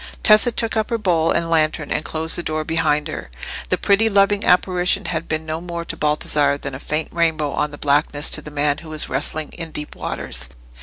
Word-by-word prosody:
Tessa 215 +3 +6
took 230 0 -1
up 220 0 0
her 230 - 0
bowl 170 -6 +1
and 165 - +1
lantern, 155 -2 0
and 155 - 0
closed 160 +1 -1
the - - +1
door 155 -2 -2
behind 155 -2 0
her. 110 - -6 0.4
The - - +2
pretty 210 +3 +3
loving 200 0 +3
apparition 180 +1 +2
had 165 0 -3
been 155 0 -2
no 160 +1 -4
more 170 -1 -5
to - - -5
Baldassarre 150 -1 +2
than 140 -1 -6
a 130 - -6
faint 150 +2 -3
rainbow 160 -3 0
on 150 - -1
the 145 - -10
blackness 145 +1 +1
to 150 - +3
the 150 - -9
man 145 -1 0
who 160 -1 -11
is 155 - -1
wrestling 150 +3 -1
in 165 -1 -6
deep 150 -1 -5
waters. 65 -1 -3
160 Hz, 215 wpm, -20 LUFS, 150-175 Hz, 0.4 s, Tessa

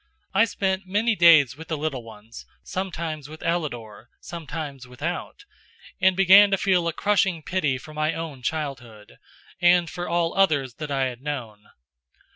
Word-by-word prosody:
I 210 +4 +5
spent 190 -3 -2
many 215 +4 +1
days 165 -8 +6
with 160 +2 -11
the 160 - -2
little 145 -4 -3
ones, 110 0 -13 0.2
sometimes 165 -6 -5
with 155 +1 -11
Ellador, 120 -10 -3
sometimes 155 -6 -7
without, 165 - -6 0.6
and 190 -1 +4
began 195 +2 +7
to 195 - +2
feel 180 -3 +1
a - - +1
crushing 190 -5 +1
pity 150 -8 0
for 155 +4 -12
my 155 +1 -1
own 160 -5 -6
childhood, 120 - -5 0.4
and 175 -1 +4
for 175 0 -5
all 170 -1 0
others 150 -10 +2
that 150 -1 -5
I 135 -1 0
had 125 -2 -4
known. 120 -8 -6
160 Hz, 155 wpm, -24 LUFS, 135-180 Hz, 0.6 s, began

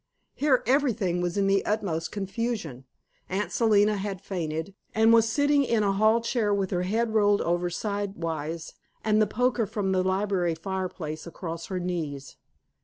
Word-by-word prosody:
Here 275 -3 +2
everything 230 -10 +1
was 175 +1 -2
in 200 - +2
the 195 0 +3
utmost 185 -7 -1
confusion. 195 - -3 0.4
Aunt 195 +3 -2
Selina 210 -2 +3
had 195 -1 -4
fainted, 165 -2 -4 0.2
and 220 +1 +5
was 225 -1 +5
sitting 285 +3 +3
in 230 -4 +1
a 200 - +2
hall 215 +3 +3
chair 230 -2 0
with 200 -2 0
her 180 -2 0
head 220 +5 0
rolled 205 -2 +4
over 175 +1 0
sidewise 170 -5 -4 0.3
and 215 0 +3
the 215 - +3
poker 240 +1 +1
from 195 -1 -1
the 185 -1 +2
library 190 -3 0
fireplace 175 -3 -4
across 165 0 -6
her 185 -2 -3
knees. 160 -6 -4
195 Hz, 160 wpm, -27 LUFS, 175-220 Hz, 0.4 s, and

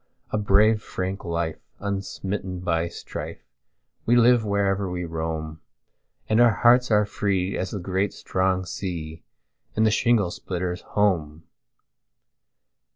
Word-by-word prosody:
a - - 0
brave 105 +2 +4
frank 95 -1 -4
life, 85 -1 -2 0.2
unsmitten 95 -1 -4
by 85 -2 0
strife, - - -7 0.6
We 120 - +5
live 120 -1 +5
wherever 100 -2 0
we 90 0 -3
roam, 80 -1 -4 0.7
And 110 +2 +3
our 120 - +7
hearts 125 +3 +4
are 105 -1 +4
free 100 -2 -1
as 95 - -2
the 105 - -4
great 95 +2 -1
strong 95 0 -1
sea, 85 -4 -5 0.5
In 110 - +3
the 110 - +4
shingle 110 -4 +2
splitter's 90 0 -4
home. 85 -7 0
95 Hz, 125 wpm, -25 LUFS, 90-105 Hz, 0.7 s, our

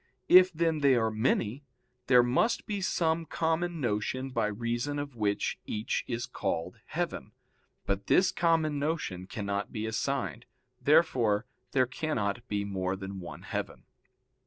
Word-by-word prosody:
If, 185 +1 +8
then, 165 -1 +1
they 140 -3 +5
are 110 -2 +2
many, 115 +3 0 0.4
there 125 -2 +7
must 130 - +1
be 205 -2 -3
some 165 -3 0
common 165 +1 -1
notion 130 +2 -1
by 115 -4 +1
reason 120 +6 -2
of 145 -2 -5
which 105 -2 -1
each 105 +1 -2
is 120 -1 -2
called 85 -5 -3
heaven, - - -3 0.5
but 100 0 -2
this 185 - +4
common 160 -3 +2
notion 140 - -2
cannot 100 -2 -3
be 110 0 -3
assigned. 120 +1 -2 0.3
Therefore 125 -9 +3 0.3
there 130 -2 +4
cannot 120 -4 -2
be 100 -1 -1
more 95 -2 -2
than 95 0 -6
one 90 - -9
heaven. - - -4
120 Hz, 140 wpm, -30 LUFS, 105-155 Hz, 0.5 s, If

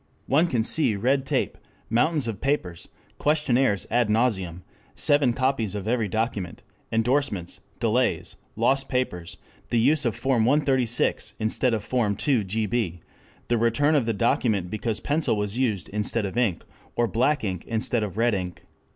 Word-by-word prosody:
One 155 +6 +3
can 120 -8 0
see 120 -3 +3
red 130 +6 +1
tape, - - -1 0.3
mountains 145 +3 +1
of 110 -4 -5
papers, 95 - -2 0.3
questionnaires 135 - +2
ad 120 -1 +2
nauseam, 95 -7 0 0.3
seven 145 -3 +3
copies 120 -5 0
of 100 0 -5
every 115 -2 +1
document, 105 -3 -3 0.3
endorsements, 115 -5 0 0.2
delays, 120 +2 0 0.2
lost 135 0 +1
papers, 90 -10 -2 0.3
the 120 - +1
use 140 +6 +3
of 120 -3 0
form 130 -4 +1
136 130 -2 +1
instead 115 +2 +1
of 105 - -4
form 110 -5 0
2gb, 110 - 0 0.5
the 120 - +1
return 130 +7 +2
of 135 -6 +2
the 115 - +1
document 105 -4 0
because 110 0 -2
pencil 145 -6 0
was 105 +3 -3
used 110 -9 0
instead 105 +1 -1
of 95 - -5
ink, 115 -8 0 0.3
or 120 - +2
black 130 +6 +1
ink 95 -4 -3
instead 115 +1 0
of 105 -2 -4
red 115 0 +2
ink. 90 -3 -4
115 Hz, 150 wpm, -25 LUFS, 105-130 Hz, 0.5 s, One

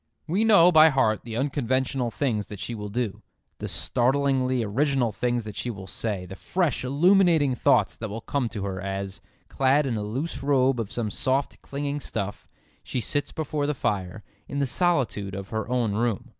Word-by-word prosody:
We 185 +7 +1
know 200 -6 +7
by 160 -1 +8
heart 120 -7 +2
the 115 -1 -5
unconventional 130 -2 0
things 115 -5 -1
that 105 - -8
she 120 - -4
will 105 -2 -5
do, 115 -1 -3 0.4
the - - -4
startlingly 130 -1 +1
original 130 +2 +1
things 120 +2 -1
that 105 -2 -8
she 125 - -3
will 100 -5 -6
say, 100 -1 -3
the 95 - -9
fresh 175 - -1
illuminating 160 +1 +4
thoughts 115 -4 +2
that 110 - -5
will 110 +3 -5
come 130 -2 -1
to 105 -4 -5
her 95 -2 -4
as, 95 -1 -4 0.3
clad 135 +2 +2
in 120 -4 -1
a - - -2
loose 130 +9 -3
robe 135 -2 +2
of 110 -2 -3
some 115 -2 -2
soft 135 +5 -1
clinging 145 +1 -3
stuff, 105 -6 -5 0.3
she - - -3
sits 145 +4 -1
before 150 -2 -2
the 150 - -1
fire, 100 -3 -2 0.2
in 140 - -5
the 140 - +2
solitude 125 - 0
of 100 0 -6
her 110 +2 -3
own 120 -4 +1
room. 120 +2 -1
125 Hz, 185 wpm, -26 LUFS, 105-140 Hz, 0.4 s, by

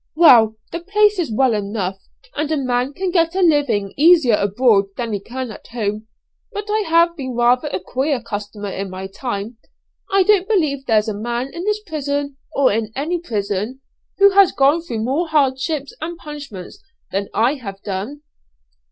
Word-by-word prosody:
"Well, 235 -10 +6 0.2
the 335 - -3
place 415 +3 +2
is 315 -9 -1
well 255 +2 +2
enough, 200 -2 -3 0.4
and 300 +1 -2
a 310 - +1
man 250 -1 0
can 375 +4 -2
get 335 -1 +2
a 385 - +1
living 270 - +2
easier 315 -5 +5
abroad 205 +1 +3
than 235 -3 -3
he 205 - -1
can 250 +3 -6
at - - -12
home. 215 -2 -3 0.4
But 415 -1 -5
I 430 -1 +1
have 335 +1 +4
been 260 -5 -5
rather 240 +1 +3
a 185 - -3
queer 265 - -1
customer 205 -2 -6
in 195 0 -4
my 185 +1 -6
time. 210 +2 -5 0.5
I 390 -1 +4
don't 390 -1 +3
believe 300 - 0
there's 215 -1 +3
a 215 - -1
man 240 +5 -3
in 345 +2 -5
this 425 0 0
prison, 285 -3 -3 0.2
or 275 -2 +4
in 220 0 -2
any 325 +6 -1
prison, 210 - -3 0.4
who 400 0 +6
has 390 -1 +6
gone 280 +5 +3
through 230 -9 -4
more 285 +9 0
hardships 280 -1 0
and 335 +2 -5
punishments 290 - -9 0.3
than 200 +1 -2
I 230 +6 +3
have 195 -2 -7
done." 205 +9 -5
260 Hz, 180 wpm, -19 LUFS, 215-325 Hz, 0.5 s, Well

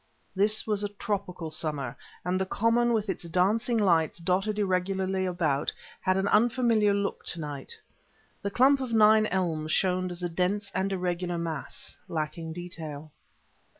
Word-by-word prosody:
This 210 +3 +3
was 210 -2 0
a 205 - -1
tropical 195 -5 -4
summer, 150 -6 -2 0.3
and 185 +1 0
the - - +1
common, 230 +4 +2
with 220 -2 +1
its 190 -2 -3
dancing 210 +7 +2
lights 170 -7 +3
dotted 190 +4 0
irregularly 190 -1 0
about 160 -6 0
it, - - -7 0.3
had 185 0 +1
an 195 +1 +1
unfamiliar 230 -2 +3
look 200 0 -1
to 175 - -4
night. 145 -3 -5 0.6
The 200 - -1
clump 265 +6 +4
of 250 -3 -3
nine 215 0 +6
elms 165 -5 -1
showed 185 0 +1
as 175 0 -6
a - - +1
dense 195 +4 -1
and 190 +1 0
irregular 180 -1 -1
mass, 165 -4 -5
lacking 160 +1 -3
detail. 160 -3 -7
185 Hz, 155 wpm, -28 LUFS, 170-210 Hz, 0.6 s, nine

